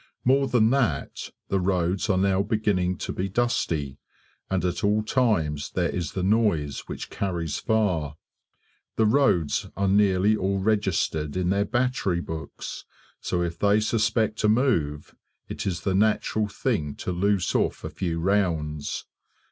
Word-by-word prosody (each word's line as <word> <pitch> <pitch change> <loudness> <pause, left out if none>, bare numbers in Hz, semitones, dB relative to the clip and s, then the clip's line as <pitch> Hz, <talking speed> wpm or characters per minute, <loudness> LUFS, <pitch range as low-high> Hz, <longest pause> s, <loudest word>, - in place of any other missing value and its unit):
More 135 +2 +4
than 115 -3 +3
that, 115 - -1 0.2
the 95 - +1
roads 90 +1 0
are 95 - +3
now 95 0 +2
beginning 100 -4 0
to - - -4
be 95 +2 -2
dusty, 85 - -1 0.5
and 95 -2 0
at 90 -1 -2
all 105 +1 +2
times 95 - 0
there 90 -2 -1
is 85 -4 -3
the 95 - -2
noise 95 -9 +1
which - - -7
carries 85 -6 -2
far. 90 -10 0 0.8
The 110 - +3
roads 105 - +2
are 100 0 +1
nearly 100 +1 +3
all 100 -1 0
registered 95 -7 0
in 90 0 +1
their 100 +1 +1
battery 120 -6 0
books, 80 -3 -6 0.4
so 90 -1 -1
if 85 -1 -4
they 105 +1 +4
suspect 110 0 0
a 105 - +4
move, 85 - +1 0.3
it - - -5
is 85 -3 -2
the 95 - 0
natural 105 +1 +1
thing 100 - -2
to - - -4
loose 95 +1 +1
off - - 0
a - - -4
few 85 -3 -2
rounds. 80 -6 -1
95 Hz, 150 wpm, -25 LUFS, 85-110 Hz, 0.8 s, More